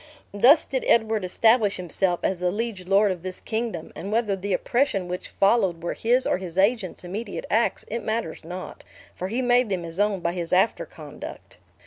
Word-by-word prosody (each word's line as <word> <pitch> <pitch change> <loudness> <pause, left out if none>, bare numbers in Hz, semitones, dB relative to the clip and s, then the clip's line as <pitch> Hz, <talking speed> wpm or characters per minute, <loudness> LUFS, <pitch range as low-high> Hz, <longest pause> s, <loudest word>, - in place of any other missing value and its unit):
"Thus 260 +10 +6
did 260 -2 -2
Edward 220 -2 +3
establish 220 +3 +3
himself 180 0 0
as 190 - 0
the 180 0 +1
liege 205 -2 -4
lord 200 +1 +4
of 180 -2 -5
this 185 +1 -6
kingdom; 220 -7 -4
and 190 +6 -6
whether 215 -3 +1
the 195 +1 -5
oppresion 200 -2 +1
which 180 0 -5
followed 195 -5 +2
were 175 - -2
his 245 +3 +1
or - - +1
his 180 -2 -7
agents' 200 -2 +1
immediate 200 +4 -5
acts, 225 +3 +1
it 235 - -3
matters 220 -7 -3
not, 180 +3 -8 0.3
for 185 - -4
he 235 +6 -1
made 245 -1 +3
them 185 -3 -2
his 165 +2 -7
own 205 -2 +2
by 170 0 -1
his 175 -1 -4
after 190 +5 +2
conduct. - - -10
195 Hz, 190 wpm, -25 LUFS, 180-230 Hz, 0.3 s, Thus